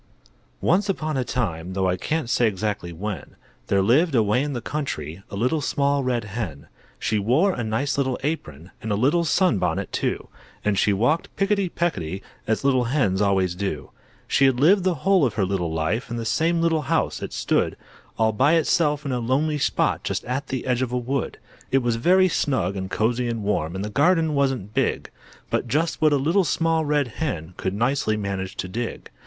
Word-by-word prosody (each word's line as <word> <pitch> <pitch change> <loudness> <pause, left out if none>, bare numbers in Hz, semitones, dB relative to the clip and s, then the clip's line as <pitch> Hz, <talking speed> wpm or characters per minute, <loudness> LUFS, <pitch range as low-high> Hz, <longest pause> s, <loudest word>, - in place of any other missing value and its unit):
Once 195 +5 +2
upon 155 -5 -1
a 130 - +1
time, 95 -9 -3
Though 95 0 +1
I 90 - +1
can't 155 - -2
say 120 0 +3
exactly 100 -3 -2
when, 95 +3 -6 0.3
There 100 -1 +2
lived, 140 - +3
away 110 +2 +3
in 145 0 -2
the 120 - -2
country, 95 - -4
A - - -7
Little 125 +9 +1
Small 140 -1 +1
Red 125 -3 0
Hen. 100 -8 -5 0.3
She 110 - 0
wore 135 - +3
a 120 - -3
nice 125 +6 -1
little 130 -2 0
apron, 90 - -4
And 110 -2 -4
a - - +2
little 145 +11 +2
sunbonnet 115 - +1
too, - - -2 0.4
And 105 -1 +2
she 105 - +3
walked 120 +12 +1
picketty 195 -1 +1
pecketty, 95 - -2 0.2
As 110 +3 0
little 130 -3 +3
Hens 115 -7 +1
always 95 -3 +2
do. 95 +2 -4 0.4
She 140 - +3
had 130 -2 +3
lived 180 +7 +5
the 185 -2 +2
whole 195 -3 +5
of 120 -6 +1
her 100 -3 +1
little 90 -3 -1
life, 80 +11 -1
In 120 - -3
the 115 - -4
same 165 +7 +1
little 165 -2 +2
house; - - 0
it - - -5
stood - - 0 0.4
All 110 0 +3
by 135 +8 +3
itself, 150 -2 +2
in 140 - -2
a 125 - 0
lonely 145 +6 0
spot, - - +1
Just - - -2
at 135 +3 -3
the 130 -2 -3
edge 125 -1 +1
of 130 -2 -1
a 125 - 0
wood. 130 +2 -2 0.3
It 135 -1 +2
was 120 -1 +1
very 185 +9 +4
snug 130 - 0
and 95 -1 -4
cosy 120 +4 0
and 115 -2 -3
warm, 95 -5 -1
And 95 +2 -3
the - - -4
garden 160 - +3
wasn't 135 -8 0
big, - - -1 0.4
But - - 0
just 160 +3 0
what 155 -1 +5
a 145 - +4
Little 165 +8 +2
Small 165 0 +1
Red 145 -2 +1
Hen 100 - -4
Could 95 +1 -3
nicely 115 -1 +1
manage 95 -2 -4
to - - -3
dig. 115 +5 -5
125 Hz, 200 wpm, -24 LUFS, 100-150 Hz, 0.4 s, lived